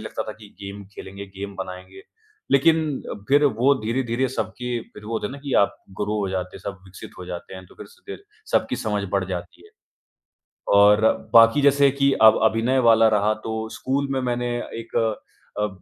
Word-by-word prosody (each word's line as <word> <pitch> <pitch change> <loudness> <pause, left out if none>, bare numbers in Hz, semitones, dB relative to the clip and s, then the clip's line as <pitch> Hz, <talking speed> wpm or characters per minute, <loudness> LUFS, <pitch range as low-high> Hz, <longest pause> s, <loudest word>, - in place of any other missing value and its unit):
लगता - - -5
था - - -4
कि 105 - -12
गेम 100 0 -8
खेलेंगे, 100 +1 -9
गेम 100 +1 -8
बनाएँगे। 95 0 -8 0.5
लेकिन 155 0 +2 0.3
फिर 145 +2 +4
वो 135 +1 +3
धीरे-धीरे 125 +2 -1
सबके 125 -1 -3 0.2
फिर 105 - -12
वो 110 - -6
होता 110 - -1
है - - -7
ना 140 - -8
कि 140 -3 -5
आप - - -1 0.2
ग्रो 105 +1 -1
हो 100 - -1
जाते 90 -1 -4
हैं, - - -12
सब 100 -2 -6
विकसित 95 -1 -11
हो 90 - -7
जाते 90 +1 -7
हैं 95 0 -10
तो - - -19
फिर - - -11
स 470 0 -22
क - - -5 0.4
सब - - +3
की - - -1
समझ 105 -2 -2
बढ़ 100 -2 +1
जाती 90 -2 -6
है 425 - -18 1.0
और 105 +1 +6 0.3
बाकी 115 +4 +7
जैसे 140 0 +5
कि 140 0 +2
अब 110 0 +8
अभिनय 115 +4 +2
वाला 115 0 +6
रहा 105 0 +2
तो 110 - -3 0.2
स्कूल 140 +2 -2
में 135 -1 0
मैंने 120 -1 -1 0.3
एक 115 - -9 0.6
अ, 105 0 +1
110 Hz, 195 wpm, -23 LUFS, 100-130 Hz, 1.0 s, अब